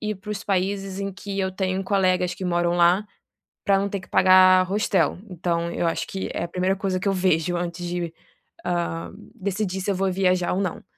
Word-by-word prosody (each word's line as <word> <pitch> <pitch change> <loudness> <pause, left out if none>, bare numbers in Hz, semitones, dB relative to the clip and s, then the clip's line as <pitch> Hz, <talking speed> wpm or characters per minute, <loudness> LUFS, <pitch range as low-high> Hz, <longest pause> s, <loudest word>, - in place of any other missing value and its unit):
ir 215 -1 -2
para 210 +2 -9
os 210 0 -4
países 195 0 -1
em 195 0 -3
que 200 +1 -6
eu 190 0 -1
tenho 190 0 -1
colegas 185 -2 +1
que 190 - -7
moram 175 -1 +1
lá, 175 +4 +4 0.6
para 195 -1 +4
não 200 - -1
ter 200 -1 -3
que - - -14
pagar 185 0 +6
hostel, 200 -5 +1
então 170 -1 -2
eu 170 - -1
acho 165 - -1
que 190 - -4
é 170 - -2
a - - -6
primeira 185 +2 0
coisa 190 -1 -1
que 200 - -3
eu - - +1
vejo 175 -2 +1
antes 175 0 -4
de, 175 -1 -3 0.5
ah, 170 -2 -2 0.3
decidir 195 -2 -2
se 195 - -3
eu - - -1
vou 190 0 0
viajar 180 -1 +1
ou 190 - 0
não. 185 -4 -3
185 Hz, 215 wpm, -24 LUFS, 175-195 Hz, 0.6 s, pagar